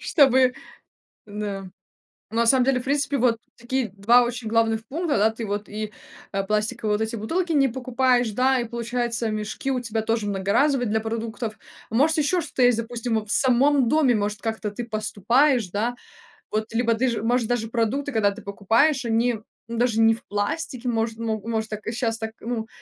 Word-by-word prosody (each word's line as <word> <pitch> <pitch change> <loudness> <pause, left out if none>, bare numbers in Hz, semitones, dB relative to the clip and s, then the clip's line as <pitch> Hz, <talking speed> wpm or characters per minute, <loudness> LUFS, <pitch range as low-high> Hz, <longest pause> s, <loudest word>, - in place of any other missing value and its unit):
чтобы, 260 -4 +4 0.7
да. 205 -2 -5 0.7
На 230 0 +2
самом 255 +1 +5
деле 265 -1 +2
в - - -9
принципе 280 0 0
вот 235 -2 +2 0.2
такие 240 -1 -2
2 235 +5 +5
очень 240 -1 -3
главных 225 0 +1
пункта, 315 +2 -1
да, 215 +2 +4
ты 225 0 -6
вот 205 +1 -3
и, 210 0 -5 0.4
а, 195 0 -1
пластиковые 215 +1 0
вот - - -1
эти 220 +1 -2
бутылки 335 - -2
не 275 -3 +4
покупаешь, 250 -1 +1
да, 255 +3 +2
и - - -2
получается 235 -1 -2
мешки 215 +5 -3
у 250 - -1
тебя 225 -2 -2
тоже 225 -1 -1
многоразовые 235 +6 +1
для 220 +1 +1
продуктов. 225 0 -4 0.3
Может 295 +8 +2
ещё 305 +5 +2
что-то 280 -4 -3
есть 245 -2 +5
допустим 230 0 -2
а 215 - -4
в 210 - -4
самом 265 0 +3
доме 285 -5 +3
может 210 0 -1
как-то 220 -2 -3
ты 225 +4 -5
поступаешь, 230 +3 +1
да, 230 +6 -1 0.6
вот 215 +1 -2
либо 230 0 +2
ты 255 +4 +1
же 230 -3 -3
может 235 0 +1
даже 225 -2 -1
продукты 250 +5 -1
когда 215 -4 +2
ты 200 - -10
покупаешь 230 +8 +1
они, 230 +2 +2 0.4
м, 235 - -4
даже 235 -2 +1
не 225 0 +6
в 230 - -9
пластике 245 +5 -3
может 225 -1 -1
могу 220 -1 -3
может 220 -1 -1
так, 215 -1 -7
э, 225 - 0
щас 230 -1 -1
так 220 0 -4
ну 225 -1 -3
230 Hz, 190 wpm, -24 LUFS, 220-250 Hz, 0.7 s, не